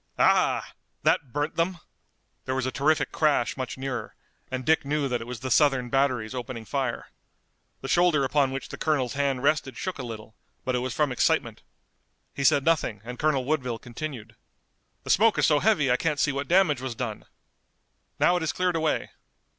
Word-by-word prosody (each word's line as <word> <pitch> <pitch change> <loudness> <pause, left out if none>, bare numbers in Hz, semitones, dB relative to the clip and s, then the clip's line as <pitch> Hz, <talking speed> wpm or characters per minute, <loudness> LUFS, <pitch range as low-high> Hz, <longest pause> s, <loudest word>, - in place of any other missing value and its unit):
Ah - - +3
h! - - -18 0.3
That 135 - +2
burnt 145 +5 -2
them!" 175 +2 0 0.7
There 130 - -2
was 130 -1 -1
a 130 - -1
terrific 150 +4 +1
crash 145 -6 +1
much 130 -1 -5
nearer, 135 -1 -5 0.3
and 130 -1 -4
Dick 160 0 +3
knew 145 0 0
that 120 -2 -2
it 115 - -8
was 120 -2 -7
the 130 -1 -4
Southern 135 -3 +3
batteries 130 -4 +1
opening 125 -2 -6
fire. 130 -1 -3 0.7
The - - -5
shoulder 175 -5 +3
upon 135 0 +2
which 135 +1 -5
the - - -8
colonel's 140 -6 0
hand 140 -2 -1
rested 140 -2 +1
shook 185 -5 -4
a - - -2
little, 110 -2 -8 0.3
but 130 - 0
it 125 - +1
was 125 -1 -3
from 150 -3 +1
excitement. 125 - +1 0.7
He 140 - -4
said 135 +1 +4
nothing 145 -11 +1
and 125 +1 -8
Colonel 150 -4 +1
Woodville 125 -5 -1
continued: 120 -2 -7 0.7
"The - - -1
smoke 220 +2 +4
is - - +3
so 150 -2 +4
heavy 155 - +3
I 125 - +3
can't 150 -1 -1
see 145 - +2
what 140 0 -3
damage 170 -7 +3
was 130 -3 -4
done! 110 -3 -5 0.9
Now 180 - +4
it - - -3
has 160 - -1
cleared 180 -1 0
away! 160 -1 0
135 Hz, 195 wpm, -26 LUFS, 125-155 Hz, 0.9 s, said